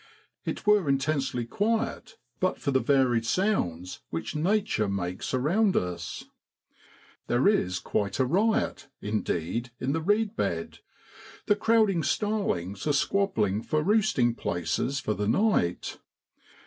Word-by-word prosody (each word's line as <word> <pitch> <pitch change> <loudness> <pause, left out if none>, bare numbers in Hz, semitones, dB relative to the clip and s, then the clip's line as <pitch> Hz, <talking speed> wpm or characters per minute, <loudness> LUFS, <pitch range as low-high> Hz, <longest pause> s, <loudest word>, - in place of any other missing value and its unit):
It - - -4
were 210 -7 +4
intensely 135 -3 0
quiet 220 - -2 0.2
but 185 - 0
for 140 - -1
the 130 - +3
varied 130 -5 +2
sounds 115 - -1
which 80 - -4
Nature 180 - +1
makes 90 -2 -3
around 180 - +2
us. 85 -2 -3 1.0
There 120 +6 +2
is 90 - +2
quite 100 +1 -2
a 130 - +2
riot, 200 - +1
indeed, 105 +2 -2
in 130 - -1
the 160 - -1
reed 210 +4 +1
bed; - - -2 0.7
the 205 - +3
crowding 215 -5 +3
starlings 155 - -1
are 150 - +3
squab 195 +7 +1
bling 105 -1 +1
for 155 +5 -1
roosting 195 - +2
places 85 - -2
for 110 - -1
the 105 0 -2
night. 115 - +1
140 Hz, 130 wpm, -27 LUFS, -, 1.0 s, were